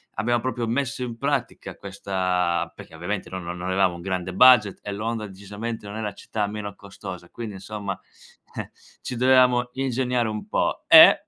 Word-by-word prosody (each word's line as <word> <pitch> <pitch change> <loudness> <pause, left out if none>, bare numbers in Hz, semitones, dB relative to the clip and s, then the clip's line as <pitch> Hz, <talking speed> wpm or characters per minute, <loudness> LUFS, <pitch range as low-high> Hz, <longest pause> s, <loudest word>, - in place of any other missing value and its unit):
abbiam 120 +3 +1
proprio 125 -2 -2
messo 125 +1 -1
in 120 -2 -4
pratica 140 +4 -2
questa 90 -2 -1
perché - - -12
ovviamente 95 +5 -4
noi 95 -1 -5
non 85 +1 -6
avevamo 95 0 +2
un 85 - -9
grande 95 -1 -3
budget 110 -2 +6
e 100 - -5
Londra 110 +1 -3
decisamente 105 +3 -6
non 100 +1 -6
è 110 - -3
la 105 -1 -3
città 105 -2 -3
meno 105 -1 -5
costosa, 95 -3 -9
quindi 115 -3 -6
insomma, 100 0 -5 0.6
eh - - -5 0.3
ci 125 - -5
dovevamo 125 -1 +5
ingegnare 125 -2 0
un 105 -1 -5
po'. - - 0
E - - +9
105 Hz, 170 wpm, -24 LUFS, 95-120 Hz, 0.6 s, E